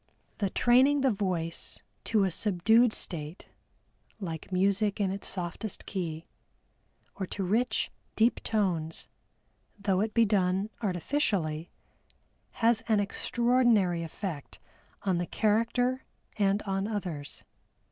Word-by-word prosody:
The 200 Hz, -3 st, +1 dB
training 260 Hz, +7 st, +4 dB
the 265 Hz, -1 st, +3 dB
voice 180 Hz, -5 st, -2 dB, 0.3 s
to 215 Hz, -3 st, +3 dB
a 190 Hz, -, +1 dB
subdued 215 Hz, +6 st, +3 dB
state 160 Hz, -4 st, -4 dB, 0.7 s
"like 165 Hz, -3 st, -6 dB
music 200 Hz, +3 st, +1 dB
in 195 Hz, -2 st, +1 dB
its 200 Hz, +1 st, -5 dB
softest 185 Hz, +3 st, -4 dB
key," 165 Hz, -4 st, -4 dB, 0.9 s
or 190 Hz, -, -3 dB
to 195 Hz, -, -4 dB
rich, 225 Hz, +7 st, 0 dB, 0.2 s
deep 230 Hz, +2 st, +3 dB
tones, 175 Hz, -7 st, -1 dB, 0.7 s
though 200 Hz, -2 st, +1 dB
it 215 Hz, 0 st, -2 dB
be 230 Hz, -1 st, +5 dB
done 195 Hz, 0 st, +1 dB
artificially, 180 Hz, -, -1 dB, 1.0 s
has 230 Hz, -1 st, +5 dB
an 215 Hz, -2 st, +3 dB
extraordinary 225 Hz, -3 st, +2 dB
effect 165 Hz, -2 st, -6 dB, 0.5 s
on 185 Hz, -3 st, +1 dB
the 175 Hz, -, -2 dB
character 235 Hz, +4 st, +1 dB, 0.3 s
and 200 Hz, 0 st, +1 dB
on 195 Hz, 0 st, -1 dB
others. 180 Hz, -9 st, -5 dB
200 Hz, 115 wpm, -29 LUFS, 180-225 Hz, 1.0 s, be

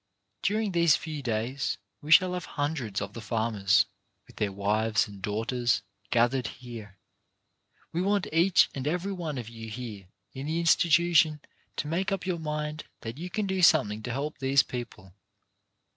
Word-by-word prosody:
During 210 Hz, +1 st, 0 dB
these 170 Hz, -3 st, +5 dB
few 155 Hz, -2 st, -5 dB
days 120 Hz, +2 st, -1 dB, 0.2 s
we 150 Hz, +1 st, -6 dB
shall 180 Hz, +3 st, +7 dB
have 180 Hz, -1 st, -3 dB
hundreds 140 Hz, -10 st, -1 dB
of 100 Hz, 0 st, -5 dB
the 115 Hz, -, -7 dB
farmers, 110 Hz, -3 st, +2 dB, 0.4 s
with -, -, -19 dB
their 105 Hz, -2 st, 0 dB
wives 110 Hz, +3 st, +1 dB
and 100 Hz, -2 st, -11 dB
daughters, 115 Hz, +4 st, 0 dB, 0.3 s
gathered 120 Hz, +1 st, +2 dB
here. 110 Hz, -6 st, -9 dB, 0.9 s
We 170 Hz, -, -1 dB
want 200 Hz, +1 st, +1 dB
each 170 Hz, +3 st, +5 dB
and 135 Hz, 0 st, -4 dB
every 180 Hz, +5 st, -1 dB
one 165 Hz, -7 st, -4 dB
of 120 Hz, -3 st, -5 dB
you 115 Hz, -1 st, -8 dB
here 110 Hz, -5 st, -7 dB, 0.3 s
in 135 Hz, +2 st, -6 dB
the 160 Hz, +2 st, 0 dB
institution 165 Hz, -2 st, +4 dB, 0.4 s
to -, -, -3 dB
make 180 Hz, +5 st, -1 dB
up 195 Hz, -2 st, -2 dB
your 180 Hz, -2 st, -1 dB
mind 150 Hz, 0 st, -3 dB, 0.2 s
that 115 Hz, +5 st, -6 dB
you 180 Hz, +2 st, -5 dB
can 210 Hz, +3 st, -1 dB
do 190 Hz, -1 st, -1 dB
something 120 Hz, -11 st, +4 dB
to 120 Hz, -, -4 dB
help 140 Hz, +4 st, -3 dB
these 135 Hz, 0 st, +4 dB
people. 120 Hz, -7 st, -7 dB
135 Hz, 165 wpm, -28 LUFS, 115-170 Hz, 0.9 s, shall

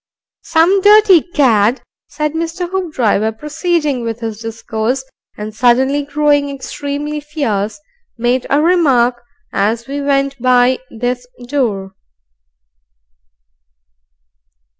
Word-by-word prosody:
"Some 350 Hz, +4 st, +3 dB
dirty 410 Hz, -4 st, +6 dB
cad," 250 Hz, -, +2 dB, 0.2 s
said 300 Hz, +1 st, -3 dB
Mr. 335 Hz, +2 st, -3 dB
Hoopdriver, 265 Hz, -, 0 dB
proceeding 300 Hz, +1 st, -1 dB
with 230 Hz, 0 st, -4 dB
his 225 Hz, -2 st, -5 dB
discourse, 225 Hz, +3 st, -3 dB, 0.3 s
and 210 Hz, +1 st, -6 dB
suddenly 255 Hz, +5 st, +2 dB
growing 290 Hz, 0 st, +1 dB
extremely 285 Hz, +2 st, -5 dB
fierce, 280 Hz, -8 st, -3 dB, 0.4 s
"made 245 Hz, +2 st, 0 dB
a 290 Hz, +2 st, +2 dB
remark 260 Hz, -9 st, +3 dB, 0.3 s
as 225 Hz, +4 st, 0 dB
we 285 Hz, +1 st, -4 dB
went 275 Hz, -1 st, 0 dB
by 250 Hz, 0 st, +3 dB
this 245 Hz, +2 st, -3 dB, 0.2 s
door." 215 Hz, -9 st, -2 dB
270 Hz, 95 wpm, -16 LUFS, 235-300 Hz, 0.4 s, dirty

